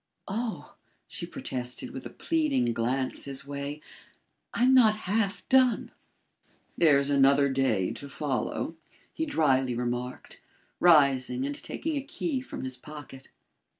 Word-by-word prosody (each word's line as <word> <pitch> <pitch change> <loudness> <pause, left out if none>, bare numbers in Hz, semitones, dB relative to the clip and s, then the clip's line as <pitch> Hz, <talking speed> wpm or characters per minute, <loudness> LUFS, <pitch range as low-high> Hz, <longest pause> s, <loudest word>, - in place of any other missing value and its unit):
"Oh!" 220 +3 -4 0.3
she - - -6
protested, 125 - -4
with 130 - -7
a - - -11
pleading 300 - 0
glance 125 +3 -1
his 140 0 -2
way, 140 +1 -5 0.7
"I'm 250 +2 +3
not 225 -5 +6
half 200 0 0
done." 255 -2 +3 0.8
"There's 145 -4 +4
another 140 0 +5
day 130 -8 +1
to 140 - -9
follow," 145 +3 -3 0.4
he 320 - -2
dryly 135 - +2
remarked, 125 +1 -4 0.4
rising 135 -6 +4
and 145 - -2
taking 310 - -4
a - - -1
key 280 -1 -3
from 260 - -7
his 130 -1 -4
pocket. 140 -1 -11
140 Hz, 125 wpm, -28 LUFS, 130-215 Hz, 0.8 s, not